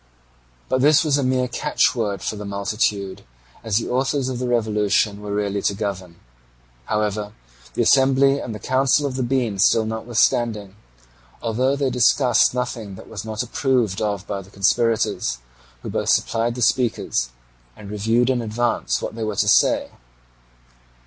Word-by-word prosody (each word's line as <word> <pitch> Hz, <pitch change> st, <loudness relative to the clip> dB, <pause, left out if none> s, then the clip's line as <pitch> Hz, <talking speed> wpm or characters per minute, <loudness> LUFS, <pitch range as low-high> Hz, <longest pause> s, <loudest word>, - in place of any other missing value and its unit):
But 130 Hz, -, 0 dB
this 150 Hz, +3 st, +5 dB
was 145 Hz, -2 st, +2 dB
a -, -, 0 dB
mere 130 Hz, 0 st, +1 dB
catchword 110 Hz, -3 st, 0 dB
for -, -, -2 dB
the 105 Hz, -, -7 dB
multitude, 100 Hz, -1 st, -2 dB, 0.4 s
as 110 Hz, -3 st, 0 dB
the 115 Hz, -, -1 dB
authors 130 Hz, +1 st, 0 dB
of 125 Hz, -2 st, -4 dB
the 125 Hz, -, -2 dB
revolution 105 Hz, -3 st, +1 dB
were 105 Hz, 0 st, -6 dB
really 100 Hz, -1 st, -1 dB
to 100 Hz, -, 0 dB
govern. 95 Hz, -4 st, -5 dB, 0.7 s
However, 105 Hz, -1 st, -2 dB, 0.4 s
the -, -, +2 dB
Assembly 135 Hz, +1 st, +4 dB
and 115 Hz, -5 st, -6 dB
the -, -, -5 dB
Council 135 Hz, +6 st, +1 dB
of 140 Hz, -, -2 dB
the 130 Hz, -, -2 dB
Bean 120 Hz, -5 st, -1 dB
still 110 Hz, +3 st, +4 dB
met 110 Hz, +1 st, -3 dB
notwithstanding, 110 Hz, -3 st, 0 dB, 0.6 s
although 125 Hz, +4 st, 0 dB
they 140 Hz, -2 st, -1 dB
discussed 125 Hz, 0 st, +3 dB
nothing 115 Hz, -5 st, -4 dB
that -, -, -13 dB
was -, -, -6 dB
not 110 Hz, +1 st, -3 dB
approved 120 Hz, -5 st, 0 dB
of 105 Hz, -2 st, -2 dB
by 100 Hz, -1 st, -4 dB
the 95 Hz, -, -16 dB
conspirators, 110 Hz, -, +1 dB, 0.5 s
who -, -, -5 dB
both -, -, -2 dB
supplied 115 Hz, +1 st, +1 dB
the 125 Hz, -, -1 dB
speakers 110 Hz, -, 0 dB, 0.5 s
and 100 Hz, -1 st, -10 dB
reviewed 115 Hz, +5 st, +1 dB
in 125 Hz, -2 st, 0 dB
advance 115 Hz, +2 st, -1 dB
what -, -, -4 dB
they 115 Hz, 0 st, -5 dB
were 110 Hz, -1 st, -2 dB
to -, -, +1 dB
say. -, -, +3 dB
115 Hz, 160 wpm, -21 LUFS, 105-125 Hz, 0.7 s, this